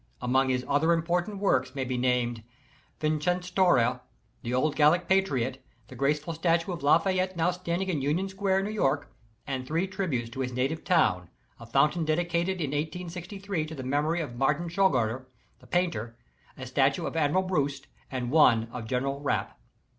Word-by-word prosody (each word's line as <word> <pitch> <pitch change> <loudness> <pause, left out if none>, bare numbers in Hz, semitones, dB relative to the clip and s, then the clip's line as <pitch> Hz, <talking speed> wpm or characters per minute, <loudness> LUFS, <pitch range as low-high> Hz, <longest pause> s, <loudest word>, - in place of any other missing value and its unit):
Among 130 +2 +2
his 125 -1 0
other 150 +4 +3
important 175 +4 -1
works 145 -10 +1
may 135 -2 -2
be 130 0 -2
named, 125 -2 0 0.6
"Vercingetorix," 160 -4 +2 0.4
the 120 - -4
old 140 +4 +1
Gallic 165 +4 +4
patriot, 135 -10 +1 0.3
the - - -10
graceful 150 +4 0
statue 165 +2 +1
of 170 -4 -5
"Lafayette" 185 +5 +2
now 170 +2 +2
standing 180 +1 -3
in 165 -7 -1
Union 155 +8 0
Square, 190 0 0
New 205 - -3
York, 145 -9 0 0.3
and 130 -2 -4
three 165 +5 0
tributes 175 -12 -3
to 130 - -8
his 125 -1 -2
native 135 +6 -1
town, 90 - +2 0.3
a 115 - -11
fountain 150 +7 +2
dedicated 170 +3 0
in 145 -3 -1
1863 180 +4 -4
to 160 - -7
the 130 - -6
memor}' 145 +5 0
of 150 -8 -4
Martin 150 +6 +1
Schongauer, 130 - +1 0.3
the - - -18
painter, 160 -11 -1 0.4
a - - -7
statue - - +1
of - - -4
Admiral 160 +4 +2
Brouat, 145 -7 -1 0.2
and 125 -2 -3
one 115 -7 +5
of 115 -2 -6
General 135 +3 -1
Rapp. 145 - -2
155 Hz, 165 wpm, -28 LUFS, 130-180 Hz, 0.6 s, one